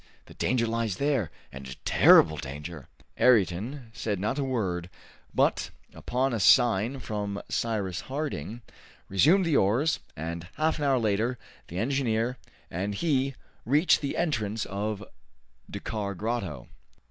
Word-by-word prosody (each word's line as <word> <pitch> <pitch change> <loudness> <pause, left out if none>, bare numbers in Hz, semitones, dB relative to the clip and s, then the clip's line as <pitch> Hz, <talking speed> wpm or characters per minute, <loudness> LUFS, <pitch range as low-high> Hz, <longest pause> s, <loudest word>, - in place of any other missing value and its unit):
The - - -14
danger 120 0 +1
lies 115 -3 -1
there, 135 - 0 0.2
and 70 0 -9
a 65 - -7
terrible 80 - +6
danger!" 75 +3 -7 0.3
Ayrton 115 - +2
said 105 -4 -2
not 110 +9 -1
a - - +1
word, 95 -10 -2 0.4
but, - - +1 0.2
upon 130 +1 -1
a 115 - -1
sign 120 +4 +4
from 105 -3 -3
Cyrus 100 -6 -1
Harding, 120 - -4 0.5
resumed 160 - +4
the 160 -4 +3
oars, 125 +11 +2 0.2
and 85 +2 -5
half 155 0 +1
an 145 - -1
hour 135 -2 +3
later 115 +2 0 0.3
the 85 - -7
engineer 120 0 0 0.3
and 100 +4 -2
he 135 -2 0 0.3
reached 150 +6 +3
the 140 - -3
entrance 110 -10 -1
of 105 +1 -3 0.7
Dakkar 100 -3 -4
Grotto. 95 - -3
110 Hz, 135 wpm, -28 LUFS, 95-130 Hz, 0.7 s, terrible